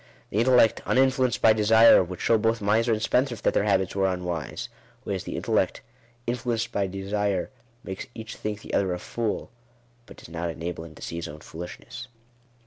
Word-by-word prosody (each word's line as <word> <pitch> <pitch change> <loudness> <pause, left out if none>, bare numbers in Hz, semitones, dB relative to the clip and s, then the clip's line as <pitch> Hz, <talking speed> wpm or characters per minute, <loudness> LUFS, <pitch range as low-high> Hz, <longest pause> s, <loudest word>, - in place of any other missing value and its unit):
The 105 - 0
intellect, 120 -2 +4
uninfluenced 130 -1 +2
by 110 - +7
desire, 110 0 +6
would 90 0 -7
show 115 -1 +3
both 115 +1 +1
miser 110 +3 +2
and 110 - +1
spendthrift 125 -2 +1
that - - +2
their 100 - +2
habits 95 -3 +1
were 95 -1 +2
unwise; 90 -5 -4 0.4
whereas - - -3
the - - -5
intellect, - - 0 0.4
influenced 120 -1 -1
by 100 -1 0
desire, 100 0 -2 0.3
makes 95 0 -6
each 110 -1 -7
think 105 -1 -4
the - - -9
other 95 -2 +1
a - - -5
fool, 115 +2 -3 0.6
but - - -13
does - - -13
not 85 +1 -3
enable 80 0 -5
him 80 -2 -12
to - - -11
see 85 - -5
his 85 - -4
own 75 +1 -10
foolishness. 85 +2 -8
105 Hz, 185 wpm, -26 LUFS, 90-115 Hz, 0.6 s, by